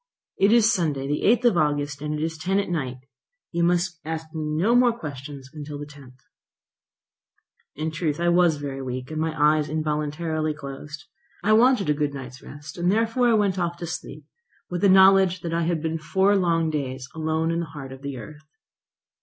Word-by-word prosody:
"It 195 +2 +5
is 230 -1 +5
Sunday, 150 -7 -1
the 145 +1 -1
8th 235 +3 +4
of 175 - -2
August, 145 -2 0
and 150 0 -2
it 150 - -2
is 160 0 -2
ten 180 +5 -1
at 200 -3 -1
night. 130 -7 -2 0.5
You 170 0 0
must 175 0 +1
ask 160 0 -4
me 160 -1 -3
no 160 +9 +1
more 245 -1 +4
questions 140 - -8
until 150 -1 -7
the 145 - -6
10th." 140 -4 -15 1.6
In 155 +2 -3
truth 155 -1 -2
I 175 0 +2
was 175 -2 +4
very 140 -2 -5
weak, 130 +1 -5
and 155 0 -2
my 160 0 0
eyes 150 0 +3
involuntarily 155 +1 -2
closed. 145 +1 -8 0.4
I 215 - +4
wanted 235 -3 +4
a 150 - +3
good 145 -1 -2
night's 130 -1 -9
rest; 145 +4 -10
and 175 +1 +2
I - - +2
therefore 230 +1 +2
went 200 -3 +1
off 170 -1 -1
to 170 - -5
sleep, 170 - -7 0.5
with 175 0 -2
the 200 - +5
knowledge 190 -1 +6
that 170 -1 -4
I 170 0 +1
had 165 -2 -1
been 160 0 -2
four 190 +6 +2
long 165 -4 +1
days 130 -3 -4
alone 160 +1 -1
in 165 - -1
the 170 - -3
heart 140 -3 -9
of 130 0 -10
the 140 -2 -5
earth. 155 +5 -11
160 Hz, 200 wpm, -24 LUFS, 145-180 Hz, 1.6 s, knowledge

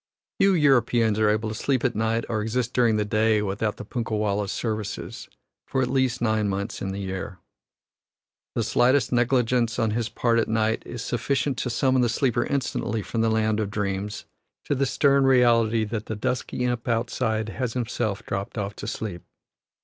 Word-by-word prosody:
Few 195 -1 +5
Europeans 120 -7 +3
are 110 -1 +4
able 110 +1 +1
to - - -4
sleep 130 +3 0
at 125 - +2
night 110 +1 0
or 110 -2 -1
exist 120 +3 -1
during 120 -3 +3
the 105 - 0
day 110 0 +2
without 105 +2 -2
the - - -7
punkah 115 0 -3
wallah's 105 -1 0
services, 110 +1 -4 0.4
for 130 - 0
at 125 - -2
least 130 -2 +1
nine 110 -2 +1
months 100 +2 -3
in 95 - -2
the 95 - -5
year. 95 -1 -5 1.2
The 115 - +1
slightest 125 +3 +3
negligence 120 -1 +2
on 115 -3 +1
his 115 +1 -1
part 115 -1 +1
at 115 - +1
night 110 0 +1
is 120 -1 -6
sufficient 130 +3 -1
to 125 - -2
summon 130 +2 +2
the 120 - +2
sleeper 120 0 +1
instantly 125 -5 -1
from 115 - -2
the 115 - +2
land 110 -1 +1
of 105 -2 -1
dreams 100 0 -3 0.4
to - - 0
the 135 0 +1
stern 140 +1 +3
reality 115 -3 +4
that 110 0 -4
the 110 - -3
dusky 120 +3 -2
imp 120 -1 -2
outside 110 -2 0
has 125 -1 -3
himself 120 -4 -2
dropped 100 +3 -4
off 100 0 -3
to 105 - -6
sleep. 105 -6 -4
115 Hz, 185 wpm, -25 LUFS, 105-125 Hz, 1.2 s, Few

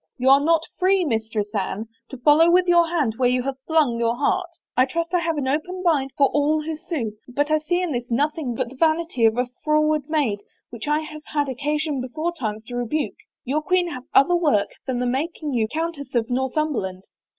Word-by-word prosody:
" - - -54
You 260 0 +2
are 275 - +7
not 325 +1 +3 0.2
free. 375 0 +3
Mistress 220 -4 -2
Anne, 205 +2 -2 0.2
to 265 - -8
follow 300 +6 +5
with 360 +1 +4
your 345 -1 +4
hand 285 -10 0
where 250 -1 +3
you 250 0 +1
have 270 0 -4
flung 300 -8 +2
your 230 0 +1
heart 345 +7 0 0.3
I 255 - +5
trust 335 +5 -3
I 355 - +4
have 330 -2 -1
an 275 -2 -1
open 355 +7 -2
mind 285 -6 +2
for 280 - +5
all 300 +2 +1
who 320 +1 -3
sue 310 -9 -4 0.2
but 290 +4 -1
I 310 - +4
see 350 +4 0
in 350 - -2
this 245 -2 -3
nothing 280 0 -1
but 255 -1 -2
the 265 - -12
vanity 315 -4 +1
of 225 +1 +3
a 250 - +2 0.2
froward 305 -1 +1
maid 280 -10 +1 0.3
which 235 +3 -7
I 300 +1 +2
have 305 -1 -8
had 290 -2 -1
occasion 295 +2 -1
beforetimes 255 -5 -4
to 245 - -7
rebuke. 245 +5 -2 0.3
Your 285 +5 0
queen 360 +1 +1
hath 255 -5 -7
other 315 +6 +5
work 295 -12 +2 0.2
than 260 -2 -1
the 250 - -1
mak 275 +7 -2
ing 300 -3 -3
you 225 -3 +1
Countess 305 -2 -4
of 235 +1 0
Northimiberland. 255 -8 -1
290 Hz, 215 wpm, -23 LUFS, 245-320 Hz, 0.3 s, are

